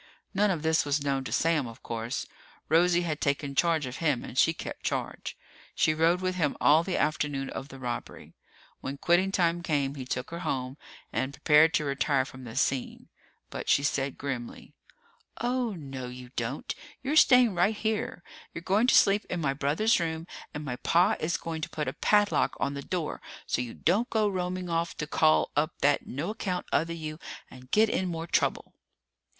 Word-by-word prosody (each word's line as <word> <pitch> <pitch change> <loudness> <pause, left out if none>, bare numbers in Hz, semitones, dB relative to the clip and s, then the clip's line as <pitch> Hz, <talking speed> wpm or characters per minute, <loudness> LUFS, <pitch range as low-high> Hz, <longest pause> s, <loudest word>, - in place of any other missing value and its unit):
None 205 +1 +3
of 170 -5 -1
this 160 0 +3
was 145 0 0
known 135 -1 0
to - - -5
Sam, 160 -5 +2
of 115 - -12
course. 115 +3 -3 0.4
Rosie 175 +2 +4
had 155 -3 -3
taken 140 0 0
charge 160 +1 +2
of 130 +1 -6
him 145 -7 0
and - - -8
she 160 - +5
kept 160 - -7
charge. - - -3 0.4
She 155 - +3
rode 165 +3 +2
with 185 0 0
him 165 -6 0
all 155 +3 +5
the 185 0 -2
afternoon 145 -3 -1
of 135 - -6
the 135 - -11
robbery. 125 -2 -6 0.5
When 140 +1 -5
quitting 175 +5 +2
time 175 -2 +1
came, 145 -4 0
he 135 -3 -7
took 125 +2 -4
her 170 - -5
home 130 -4 -3 0.4
and 130 +1 -1
prepared 150 +2 +5
to 150 - +1
retire 140 -1 +1
from 130 -1 -11
the 110 -1 -8
scene. 135 -1 -1 0.4
But - - -5
she 140 - +4
said 140 -2 -1
grimly, 130 -4 -6 0.7
"Oh, 245 -2 0
no, 135 -7 -7
you 125 0 -10
don't! 120 +4 -3 0.3
You're 280 +3 -1
staying 250 -7 +6
right 185 +5 +2
here! 215 -5 -2 0.3
You're 170 - -6
going 205 +7 +2
to - - +5
sleep 200 +1 +5
in 180 - -2
my 140 -4 0
brother's 150 +11 +2
room, 165 -1 -2 0.3
and 150 0 -6
my 125 -3 -3
pa 180 - +3
is 160 +2 0
going 165 -1 -5
to - - -3
put 150 - -3
a - - -2
padlock 205 -1 +2
on 140 - 0
the 140 - -5
door 170 0 -3 0.2
so - - 0
you 120 -2 -6
don't 205 +9 +1
go 215 -2 +2
roaming 185 -1 -2
off 170 0 -1
to 150 - -2
call 155 +1 +3
up 155 +3 +1
that 145 +1 +2
no 150 +10 -3
account 185 -5 -3
other 165 +2 +1
you 155 -2 -6 0.3
and 130 0 -13
get 220 +7 +4
in 190 -3 -1
more 165 -1 -4
trouble!" - - 0
155 Hz, 195 wpm, -28 LUFS, 140-180 Hz, 0.7 s, staying